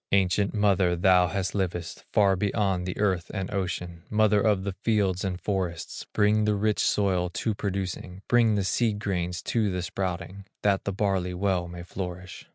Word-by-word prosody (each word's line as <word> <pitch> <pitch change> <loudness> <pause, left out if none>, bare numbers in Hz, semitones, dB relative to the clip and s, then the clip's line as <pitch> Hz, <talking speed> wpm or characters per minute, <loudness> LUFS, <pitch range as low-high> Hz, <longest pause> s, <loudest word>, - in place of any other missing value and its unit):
Ancient 100 +1 +3
mother, 100 -4 +3
thou 90 0 +4
that 95 0 -2
livest 90 -3 -3
Far 100 -2 +4
below 100 -1 0
the 90 0 -4
earth 95 -4 0
and 95 0 -3
ocean, 90 -3 -3
Mother 105 -1 +3
of 105 -3 +2
the 100 - -2
fields 100 -5 +1
and 90 -2 -2
forests, 90 -5 -3
Bring 105 0 +3
the 105 -1 +2
rich 105 +1 +1
soil 95 -3 +2
to 110 +5 -2
producing, 95 -2 -4
Bring 115 -3 +4
the 100 - +1
seed 110 +2 +1
grains 90 -4 -2
to 110 -3 +1
the 90 -1 -2
sprouting, 95 +1 -4 0.2
That 100 -2 +2
the 100 - 0
barley 95 -3 0
well 90 -2 0
may 85 0 -8
flourish. 90 0 -7
95 Hz, 170 wpm, -27 LUFS, 90-105 Hz, 0.2 s, thou